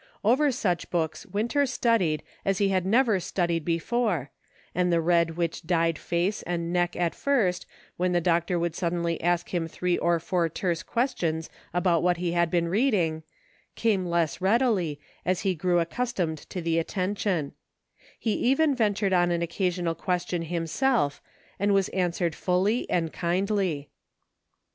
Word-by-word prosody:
Over 270 +7 +4
such 195 -9 -1
books 165 +4 -2
Winter 235 +9 0
studied 230 -11 +1 0.2
as 195 -1 +1
he 200 -1 +2
had 185 -1 0
never 225 -2 +3
studied 170 -2 -1
before, 170 - 0 0.4
and 180 0 +1
the 170 - +3
red 170 0 +2
which 170 -2 -1
dyed 165 -2 +1
face 175 +4 -1
and 170 0 -3
neck 175 0 +1
at 175 -2 0
first, 220 -11 0 0.3
when 180 +1 +1
the 175 - +3
doctor 170 +1 +1
would 170 -1 -1
suddenly 170 -1 -1
ask 175 0 +1
him 170 -2 0
three 180 +2 -1
or 170 0 +2
four 170 0 0
terse 170 0 -2
questions 175 - -1 0.2
about 175 -2 +2
what 180 0 +2
he 175 0 -1
had 170 -1 +2
been 170 -1 +1
reading, 180 -6 +1 0.5
came 210 -5 +1
less 170 -1 0
readily, 195 - +2 0.2
as 185 0 0
he 190 - +1
grew 175 +1 +1
accustomed 170 -3 -1
to 180 - -5
the 165 0 +1
attention; 185 -3 -1 0.7
he 225 - -1
even 280 +4 +2
ventured 205 -5 +1
on 175 -1 +3
an 170 -1 0
occasional 175 0 -1
question 175 +1 -2
himself, 165 - 0 0.4
and 200 +1 +2
was 195 -1 +2
answered 175 -2 0
fully 190 +8 0
and 165 -2 0
kindly. 180 - -1
175 Hz, 155 wpm, -27 LUFS, 170-200 Hz, 0.7 s, Over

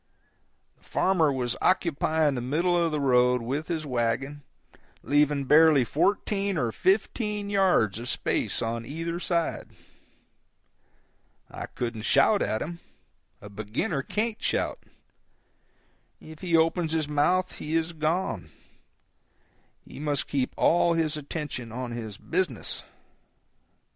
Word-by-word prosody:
The - - -30
farmer 170 -6 +2
was 125 -3 -1
occupying 160 -4 +2
the 125 - -3
middle 165 +8 +1
of 170 -2 +2
the 150 - -1
road 125 -2 +3
with 140 +6 -3
his 160 -3 -3
wagon, 130 +3 -1 0.6
leaving 145 -1 +2
barely 150 -1 +6
fourteen 200 - 0
or 120 -5 0
fifteen 205 - 0
yards 180 - +2
of 120 - -5
space - - -1
on 115 0 -2
either 165 +6 -4
side. 170 -2 -1 1.8
I - - -6
couldn't 115 -3 -4
shout 140 - +4
at 110 - 0
him—a 170 - -13
beginner 110 - -2
can't 215 - -2
shout; - - -1 1.4
if 155 0 -12
he 170 -3 +2
opens 165 0 +1
his 160 -2 0
mouth 180 +5 +1
he 155 +2 -3
is 165 +1 0
gone; 155 - -1 1.4
he 130 - -11
must 145 -2 -1
keep 135 -2 -1
all 170 0 +4
his 160 -2 0
attention 145 -5 -5
on 125 +1 -5
his 110 -3 -6
business. 170 - -2
150 Hz, 120 wpm, -27 LUFS, 125-170 Hz, 1.8 s, barely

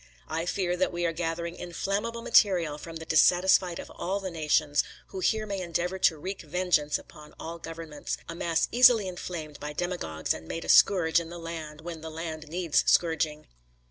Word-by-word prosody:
I 165 +2 -3
fear 180 -1 0
that 185 - +1
we 175 0 -2
are 165 - 0
gathering 170 +1 -3
inflammable 205 +6 -3
material 180 -10 +3
from 165 +2 -9
the 160 0 -7
dissatisfied 175 +2 +4
of - - -8
all 195 +3 -2
the 190 -2 -5
nations, 150 -2 +2 0.3
who 190 - -6
here 215 +3 +1
may 200 -2 -3
endeavour 180 +2 -2
to 165 -3 +3
reek 190 +6 -5
vengeance 160 -2 +1
upon 150 0 -15
all 165 +1 -6
governments; 165 -3 -6
a - - -5
mass 170 -1 0
easily 240 -4 +6
inflamed 170 -4 -6
by 150 0 -5
demagogues 160 - -2
and 80 0 -9
made 165 - -5
a - - -8
scourge 170 -4 +5
in 165 -1 -7
the 175 - -8
land, 160 -2 -7
when 165 -1 -7
the 160 - -6
land 160 -1 -6
needs 170 0 +1
scourging. 155 -2 +2
170 Hz, 185 wpm, -28 LUFS, 160-180 Hz, 0.3 s, easily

